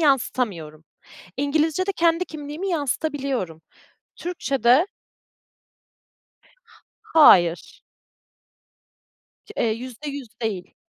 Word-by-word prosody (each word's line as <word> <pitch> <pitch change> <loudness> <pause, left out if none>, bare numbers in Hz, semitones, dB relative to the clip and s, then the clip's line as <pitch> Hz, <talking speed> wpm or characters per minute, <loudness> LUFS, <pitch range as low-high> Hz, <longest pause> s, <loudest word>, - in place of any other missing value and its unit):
yansıtamıyorum. 210 - 0 0.5
İngilizce'de 315 +6 +1
kendi 335 +1 +2
kimliğimi 310 +5 -6
yansıtabiliyorum. 275 - -2 0.6
Türkçe'de 275 - +2 2.2
Hayır. 180 - +4 1.7
K - - -20
eee, 225 - +1
%100 255 +3 -7
değil. 200 -5 -4
275 Hz, 60 wpm, -23 LUFS, 225-315 Hz, 2.2 s, Hayır